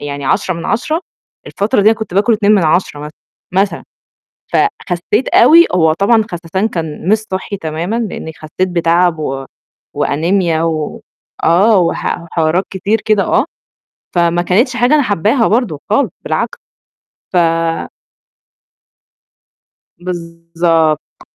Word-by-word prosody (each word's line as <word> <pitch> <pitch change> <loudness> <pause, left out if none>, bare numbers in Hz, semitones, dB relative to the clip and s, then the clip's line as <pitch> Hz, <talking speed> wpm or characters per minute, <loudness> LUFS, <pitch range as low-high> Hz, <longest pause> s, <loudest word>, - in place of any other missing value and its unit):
يعني 145 -1 -5
10 185 +6 0
من 165 - -7
10 310 +8 -1 0.5
الفترة 205 +3 0
دي 210 - +6
أنا 225 - 0
كنت 210 -5 -6
باكل 210 +4 +3
2 210 -1 +3
من 195 -6 +3
10 155 -2 0
مثلًا، 150 +1 -7 0.4
مثلًا 195 +2 0 0.7
فخسّيت 210 - 0
أوي 340 -2 +7
هو 160 -3 +4
طبعًا 215 +5 +2
خسسان 175 +4 -2
كان 165 -3 -5
مش 215 +2 +4
صحّي 200 -1 -5
تمامًا 165 +5 -3
لإني 205 -8 -4
خسّيت 160 +4 -3
بتعب 170 -1 +2
و 135 -3 -3 0.5
وأنيميا 165 +2 0
و 160 -2 -2 0.4
آه، 195 +5 +4
وح 175 - 0
وحوارات 170 +2 0
كتير 200 +3 -1
كده 215 -2 +2
آه، - - +2 0.7
فما 175 0 +2
كانتش 235 +9 +1
حاجة 245 +4 +3
أنا 300 - +4
حاباها 215 - +1
برضه 210 - 0
خالص 245 +7 +2
بالعكس، - - -2 0.8
ف - - +2 2.6
بالضبط. 170 -2 -1
180 Hz, 125 wpm, -15 LUFS, 165-215 Hz, 2.6 s, أوي